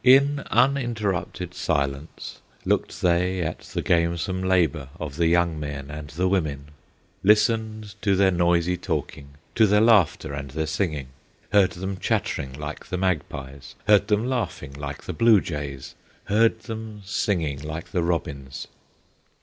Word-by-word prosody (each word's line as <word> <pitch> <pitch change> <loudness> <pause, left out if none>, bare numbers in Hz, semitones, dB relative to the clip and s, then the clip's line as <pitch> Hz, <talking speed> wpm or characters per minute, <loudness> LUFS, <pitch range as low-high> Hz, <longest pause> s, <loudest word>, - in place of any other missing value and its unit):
In 140 +2 +6
uninterrupted 120 -9 0
silence 70 +2 -3 0.3
Looked - - -1
they 90 +1 +2
at 80 - -3
the - - -5
gamesome 85 +2 +1
labor 85 -7 +1
Of 75 -3 -5
the 85 -1 +3
young 85 -2 +2
men 70 -1 -5
and 75 0 -7
the 90 +7 0
women; 75 -7 -1 0.5
Listened 110 0 +2
to 100 -1 +3
their 95 0 +4
noisy 85 0 +2
talking, 70 -3 -4 0.2
To 110 -1 +5
their 105 +1 +4
laughter 105 -11 +4
and 70 -1 -5
their 80 +4 -2
singing, 75 -4 -2 0.4
Heard 100 -2 +4
them 95 +2 -4
chattering 65 -7 -1
like 75 +1 -7
the 90 - -3
magpies, 70 -7 -3
Heard 105 -1 +5
them 105 +2 +2
laughing 120 - -3
like 70 0 -6
the 90 - -5
blue 110 +4 +5
jays, 70 -6 -5 0.3
Heard 110 +3 +2
them 110 -2 -7
singing 85 -7 -1
like 80 +2 -6
the 90 - +1
robins. 70 -6 -3
85 Hz, 140 wpm, -25 LUFS, 75-105 Hz, 0.5 s, In